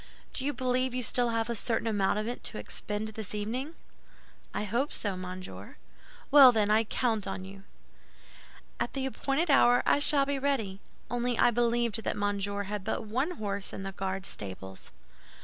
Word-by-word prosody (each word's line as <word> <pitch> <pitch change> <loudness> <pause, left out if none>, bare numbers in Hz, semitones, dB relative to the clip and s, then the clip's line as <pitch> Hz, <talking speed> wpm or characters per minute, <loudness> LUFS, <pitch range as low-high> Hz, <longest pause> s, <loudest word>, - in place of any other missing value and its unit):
"Do 260 - 0
you 290 - +1
believe 255 -1 0
you 255 - -1
have - - +4
still 245 +2 +2
a 230 +1 -1
certain 225 +1 0
amount 205 -3 +1
of 215 +1 -2
it 240 - -5
to - - 0
expend 210 +1 -4
this 215 -1 -6
evening?" 250 +10 -3 0.8
"I - - -2
hope 235 +8 -1
so, 200 -3 -1
monsieur." 185 0 -8 0.5
"Well, 275 -3 +10
then, 210 -3 +2
I 220 +1 +4
count 220 -2 0
on 190 -1 -4
you." 195 0 -12 1.1
"At - - -2
the 270 -1 -2
appointed 275 +4 0
hour 245 -3 +5
I - - +4
shall 285 -1 +5
be 280 0 -1
ready; 225 -9 -1 0.3
only 245 0 0
I 240 - +5
believed 235 -1 +1
that - - -2
Monsieur 205 0 -1
had 205 0 -4
but - - -2
one 265 +11 -1
horse 200 -2 -3
in 195 - -5
the 195 - -4
Guard 190 0 -4
stables." 95 - -7
225 Hz, 180 wpm, -29 LUFS, 200-255 Hz, 1.1 s, Well